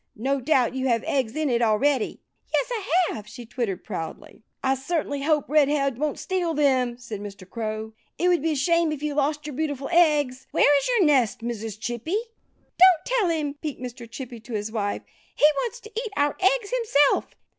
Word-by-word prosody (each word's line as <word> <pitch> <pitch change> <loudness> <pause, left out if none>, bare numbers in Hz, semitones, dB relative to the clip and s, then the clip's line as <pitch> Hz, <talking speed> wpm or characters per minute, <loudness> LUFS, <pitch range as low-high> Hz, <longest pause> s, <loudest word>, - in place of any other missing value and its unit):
No 270 +4 0
doubt 255 -3 +2
you 265 0 -1
have 230 -2 +1
eggs 260 -5 -1
in 310 -1 0
it 240 -2 +1
already." 235 +3 +1 0.3
"Yes, - - +1
I 370 -6 +1
have!" 210 -1 -8
she 235 +3 -10
twittered 225 -6 -3
proudly. 165 -2 -7 0.2
"I 265 - +3
certainly 285 +1 -2
hope 300 0 +1
Red 295 -1 +4
head 275 -4 0
won't 300 -1 -1
steal 355 -4 -1
them," 260 -5 +2
said 235 -4 -7
Mr. 200 -2 -9
Crow. 220 +1 -4 0.2
"It 355 - +1
would 350 -3 +3
be 320 +1 +1
a - - -2
shame 335 +3 +2
if 300 -1 -5
you 300 -1 -1
lost 295 +1 0
your 300 -3 -6
beautiful 285 -2 -3
eggs.... 295 -7 +3
Where 290 - +4
is - - -3
your 475 -7 +3
nest, 260 -7 +3
Mrs. 225 -3 -5
Chippy?" 240 - -2 0.6
"Don't 365 -3 +7
tell 480 -7 +1
him!" 305 -4 -1
peeped 300 -3 -4
Mr. 245 -2 -8
Chippy 240 0 -8
to 230 +2 -10
his 210 0 -3
wife. 205 -3 -2 0.3
"He - - +4
wants 475 - -2
to 435 - -12
eat 460 -1 -3
our 290 0 +2
eggs 405 +3 +2
himself." 435 - +2
275 Hz, 200 wpm, -25 LUFS, 235-315 Hz, 0.6 s, Don't